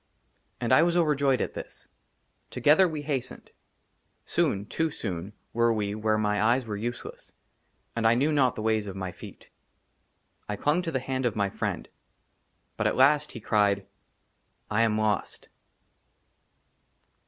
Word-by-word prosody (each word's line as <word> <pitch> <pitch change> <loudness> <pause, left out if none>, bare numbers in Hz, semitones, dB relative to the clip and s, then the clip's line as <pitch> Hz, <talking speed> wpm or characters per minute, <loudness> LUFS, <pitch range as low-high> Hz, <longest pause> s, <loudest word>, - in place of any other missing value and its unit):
AND 120 +1 +1
I 130 - +7
WAS 170 +1 +2
OVERJOYED 145 -5 +2
AT - - -2
THIS. - - -9 0.6
TOGETHER 160 +6 +4
WE 155 -3 -5
HASTENED. 135 -4 -4 0.7
SOON, 100 +1 0
TOO 160 +9 -1
SOON, 95 - -5 0.2
WERE 115 0 +3
WE 105 -2 -2
WHERE 110 0 0
MY 105 -1 0
EYES 120 +4 +2
WERE 105 -2 -4
USELESS, 120 +3 -6 0.6
AND 115 -1 +2
I 115 - +5
KNEW 140 +6 +2
NOT 135 -5 +2
THE 110 - -5
WAYS 110 -1 +1
OF 95 - -6
MY 95 -1 -4
FEET. 90 - -13 1.0
I 105 - -1
CLUNG 150 - +1
TO 170 -2 -4
THE 130 - -1
HAND 130 -1 -1
OF 115 - -3
MY 100 -2 0
FRIEND; - - -3 0.9
BUT - - +1
AT - - 0
LAST 145 +3 +4
HE 115 - -8
CRIED, 100 -2 +2 0.4
" - - -36
I 110 +2 +2
AM 110 -2 +2
LOST." 110 -1 -2
115 Hz, 155 wpm, -27 LUFS, 105-140 Hz, 1.0 s, I